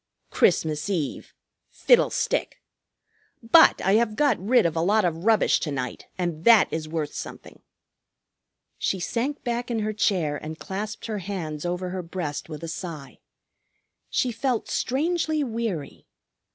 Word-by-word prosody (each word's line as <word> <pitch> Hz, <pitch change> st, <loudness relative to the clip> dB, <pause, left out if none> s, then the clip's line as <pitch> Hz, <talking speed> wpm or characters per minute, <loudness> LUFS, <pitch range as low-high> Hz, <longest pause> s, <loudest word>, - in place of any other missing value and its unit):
Christmas 155 Hz, +3 st, +2 dB
Eve! 165 Hz, -8 st, -3 dB, 0.4 s
Fiddlestick! -, -, +2 dB, 0.8 s
But 320 Hz, +8 st, +6 dB
I 190 Hz, -, +3 dB
have 225 Hz, -2 st, +1 dB
got 275 Hz, -9 st, +2 dB
rid 240 Hz, 0 st, +4 dB
of 165 Hz, -1 st, 0 dB
a 165 Hz, -, +1 dB
lot 205 Hz, +4 st, +3 dB
of 165 Hz, +1 st, -2 dB
rubbish 225 Hz, -1 st, +4 dB
to 150 Hz, -, -3 dB
night, 125 Hz, -3 st, -5 dB
and 170 Hz, -3 st, -3 dB
that 230 Hz, -1 st, +7 dB
is 155 Hz, -1 st, -3 dB
worth 155 Hz, -2 st, -3 dB
something." -, -, -9 dB, 1.2 s
She 190 Hz, -, -1 dB
sank 240 Hz, +10 st, -2 dB
back 240 Hz, 0 st, -2 dB
in 230 Hz, -2 st, -1 dB
her 215 Hz, 0 st, -2 dB
chair 175 Hz, -8 st, +1 dB
and 155 Hz, +1 st, -7 dB
clasped 205 Hz, +5 st, -5 dB
her 215 Hz, -2 st, -3 dB
hands 175 Hz, -5 st, -4 dB
over 180 Hz, +1 st, -3 dB
her 185 Hz, 0 st, -3 dB
breast 165 Hz, -4 st, -5 dB
with 155 Hz, 0 st, -8 dB
a -, -, -4 dB
sigh. 160 Hz, -4 st, -7 dB, 0.9 s
She 250 Hz, -, 0 dB
felt 240 Hz, 0 st, -2 dB
strangely 315 Hz, +3 st, 0 dB
weary. 225 Hz, -, -4 dB
190 Hz, 145 wpm, -25 LUFS, 160-230 Hz, 1.2 s, that